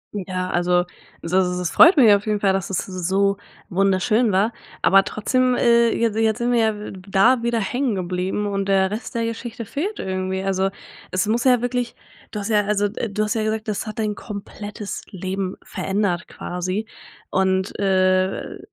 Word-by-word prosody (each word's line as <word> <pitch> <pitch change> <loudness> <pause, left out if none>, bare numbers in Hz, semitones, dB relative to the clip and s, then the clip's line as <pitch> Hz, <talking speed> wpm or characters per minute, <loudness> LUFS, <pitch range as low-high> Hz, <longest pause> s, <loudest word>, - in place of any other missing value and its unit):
Ja, 185 -1 -3
also 175 0 +2 0.4
das 170 +2 -5
s 180 -2 +1
freut 335 0 +7
mich 245 -5 +7
ja 205 -1 +7
auf 210 - -11
jeden 210 -1 +1
Fall, 195 -2 +2
dass 195 -1 -2
es 190 - -2
so 195 +2 0 0.3
wunderschön 195 +4 +2
war, 205 +5 +2 0.3
aber 195 0 +6
trotzdem, 255 +3 +1
äh, 235 -1 +4
je 230 - +1
jetzt 220 0 +2
sind 240 0 0
wir 240 - +3
ja 220 -1 +2
w 210 - -7 0.2
da 230 +6 +4
wieder 235 -1 0
hängen 245 +2 -1
geblieben 185 +3 -2
und 195 -1 -2
der 190 0 +2
Rest 225 +3 -6
der 230 0 0
Geschichte 230 0 -5
fehlt 380 - -3
irgendwie, 190 0 -3
also, 195 0 +1 0.4
es 185 +2 0
muss 230 +4 0
ja 250 -2 +5
wirklich 245 -1 -2 0.3
du 210 - -5
hast 200 - -4
ja, 210 -1 +4
also 205 0 +1
äh, 230 - -3
du 210 +2 -1
hast 210 +2 0
ja 220 -1 -1
gesagt, 220 +1 -2
das 215 +1 -3
hat 215 - -6
dein 215 -1 -1
komplettes 205 0 -7
Leben 190 0 -4
verändert 190 -3 -2
quasi 185 +5 -4 0.4
und, 190 0 0
äh, 185 -1 +1
200 Hz, 185 wpm, -22 LUFS, 190-225 Hz, 0.4 s, freut